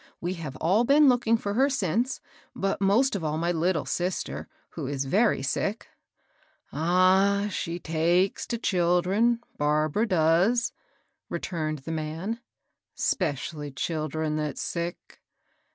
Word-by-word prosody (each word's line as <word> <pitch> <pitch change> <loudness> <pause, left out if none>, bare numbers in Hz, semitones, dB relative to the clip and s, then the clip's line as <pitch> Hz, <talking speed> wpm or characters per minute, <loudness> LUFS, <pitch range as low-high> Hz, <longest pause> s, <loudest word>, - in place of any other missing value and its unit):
We 175 +2 -2
have 155 -7 -7
all 190 - +2
been 285 +4 +5
looking 240 -3 +3
for 200 -2 -3
her 265 +6 +3
since; 235 - -1 0.3
but 195 0 -1
most 210 +6 +3
of 190 - -3
all 155 0 -1
my 170 +2 0
little 170 -1 0
sister, 180 +1 -3 0.2
who 155 -5 -6
is 140 0 -2
very 200 - +2
sick." 200 +10 -2
^^ - - -36 0.8
Ah 185 +5 +3
I 205 - -1
she 170 -3 -3
takes 170 +3 +1
to 235 - -2
children, 190 +4 +2 0.2
Barbara 155 +8 +1
does," 180 +7 +2 0.6
re - - -2
turned 155 -4 -3
the 165 - -4
man, 160 +8 -3 0.3
— - - -55
'specilly 150 -2 -2
children 155 0 -2
that's 150 -2 -3
sick. 170 +1 -5
175 Hz, 140 wpm, -27 LUFS, 155-205 Hz, 0.8 s, been